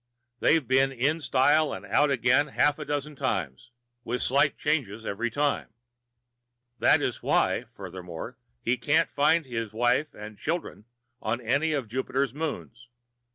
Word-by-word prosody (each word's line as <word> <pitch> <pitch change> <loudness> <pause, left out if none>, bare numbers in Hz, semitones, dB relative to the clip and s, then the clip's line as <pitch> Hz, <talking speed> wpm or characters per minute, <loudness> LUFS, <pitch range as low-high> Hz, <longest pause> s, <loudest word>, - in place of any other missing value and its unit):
They've 155 -6 +3
been 135 +1 +3
in 140 +6 0
style 145 +2 +3
and - - -7
out 145 +1 +3
again 130 +2 +3
half 145 +1 +1
a 150 - -5
dozen 145 +1 -3
times, 100 - -3 0.3
with 125 +1 -2
slight 140 +3 +2
changes 115 -8 -1
each 115 +3 -2
time. 145 0 0 1.1
That - - +4
is - - -2
why, - - +1
furthermore, 90 -3 -8 0.3
he 120 +2 +1
can't 145 +6 +2
find 155 +3 +3
his 115 -4 -4
wife 120 +6 +1
and 105 0 -10
children 160 -9 -4 0.4
on 115 +2 -1
any 140 +7 +1
of 135 -6 -2
Jupiter's 130 +2 -1
moons. 140 -5 -5
130 Hz, 145 wpm, -27 LUFS, 115-145 Hz, 1.1 s, That